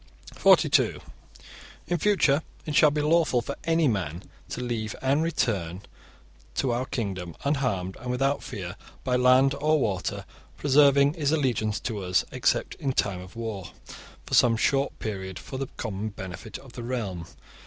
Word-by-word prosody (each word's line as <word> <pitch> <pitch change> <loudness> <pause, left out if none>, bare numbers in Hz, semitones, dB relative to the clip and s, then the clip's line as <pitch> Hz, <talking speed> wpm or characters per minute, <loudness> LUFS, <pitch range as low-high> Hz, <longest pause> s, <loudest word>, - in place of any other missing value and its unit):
(42) - - +4 0.9
In 175 -1 -1
future 160 -7 +3 0.2
it 150 - -3
shall 155 - +7
be 150 0 -1
lawful 155 -4 +3
for 140 +4 -4
any 165 -1 +3
man 90 - -2 0.3
to - - -5
leave 115 -3 -3
and 135 +3 +2
return 100 - -1 0.7
to 130 - +1
our 125 +2 -1
kingdom 95 -7 -4
unharmed 125 -11 0
and 125 - -6
without 135 +3 +1
fear, 95 -2 -6 0.3
by 125 -1 +1
land 130 +2 +5
or 155 +1 +3
water, 100 -8 -2 0.3
preserving 140 0 +5
his 150 -4 0
allegiance 125 -8 0
to 110 -4 -3
us, 90 -1 +1
except - - 0
in 135 -2 -1
time 95 -6 0
of 90 +3 -12
war, 110 -5 -5 0.5
for - - -9
some 115 -2 +5
short 135 +4 +1
period, 95 -4 -5
for 130 +10 -7
the 135 - -2
common 110 -1 -3
benefit 95 -3 -8
of 130 -3 -15
the 120 - -7
realm. 110 -9 -4
125 Hz, 155 wpm, -26 LUFS, 100-140 Hz, 0.9 s, shall